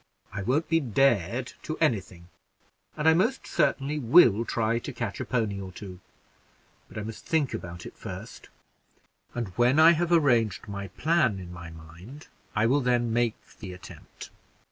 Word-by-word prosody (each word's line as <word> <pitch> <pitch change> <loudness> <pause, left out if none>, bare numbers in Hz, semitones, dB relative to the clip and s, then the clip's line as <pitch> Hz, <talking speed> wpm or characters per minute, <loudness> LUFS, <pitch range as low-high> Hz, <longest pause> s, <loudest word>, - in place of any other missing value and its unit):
I 100 - -4
won't 135 +10 0
be 165 0 +3
dared 120 - +1
to 155 - -5
any 140 -10 +2
thing, 85 -2 -16 0.7
and 150 +1 0
I 160 - +7
most 220 +11 +1
certainly 150 -3 0
will 120 - +5
try 115 0 0
to 145 - -6
catch 115 -5 -5
a - - -3
pony 110 -6 -1
or 95 -1 -7
two; 90 0 -10 0.9
but - - -12
I 110 - -3
must 110 +1 -8
think 155 -6 0
about 85 -5 -7
it - - -10
first, - - -9 0.9
and 120 -4 -3
when 125 +4 +4
I 160 +1 +9
have 170 +1 0
arranged 120 - +2
my 100 -1 -5
plan 155 - +1
in 90 -2 -9
my 85 -1 -9
mind, 85 - -13 0.3
I 105 +1 +2
will 135 +5 +3
then 120 -2 +1
make 120 -1 +1 0.2
the 95 -2 -7
attempt." 90 - -12
115 Hz, 170 wpm, -27 LUFS, 100-145 Hz, 0.9 s, I